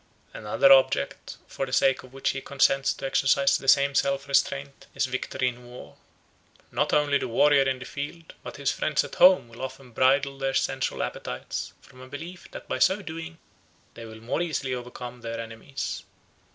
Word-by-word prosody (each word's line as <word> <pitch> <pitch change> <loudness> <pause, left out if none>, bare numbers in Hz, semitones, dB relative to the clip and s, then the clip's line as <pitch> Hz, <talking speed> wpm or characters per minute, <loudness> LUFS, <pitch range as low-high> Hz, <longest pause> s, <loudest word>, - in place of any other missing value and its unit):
Another - - +4
object - - +1
for 135 - -4
the - - -8
sake 135 0 +3
of 130 - -15
which 135 0 -1
he 135 - -5
consents 135 0 +2
to - - -6
exercise 135 +1 +3
the 135 - -4
same 140 0 +5
self 140 +1 0
restraint 140 0 -1
is - - +1
victory 130 0 -2
in 120 0 -12
war. 125 +1 -12 0.8
Not - - 0
only 145 -1 +3
the - - -3
warrior 135 +3 +4
in 130 - -1
the 125 - -9
field 155 +5 -7
but - - -9
his 140 -1 0
friends 155 -2 0
at 145 - -9
home 185 -8 +6
will 115 0 -13
often 130 -1 -7
bridle 135 +3 +2
their 135 0 -1
sensual 135 0 -1
appetites 65 - -5
from 130 - -16
a 130 - -11
belief 165 +7 -9
that - - -10
by - - -3
so 195 +2 +3
doing 165 0 -7 0.6
they 115 - -10
will 110 - -10
the 110 - -13
more 120 +8 -2
easily 145 -6 -2
overcome 125 0 -7
their 115 0 -5
enemies. 115 +4 -6
135 Hz, 190 wpm, -26 LUFS, 130-145 Hz, 0.8 s, home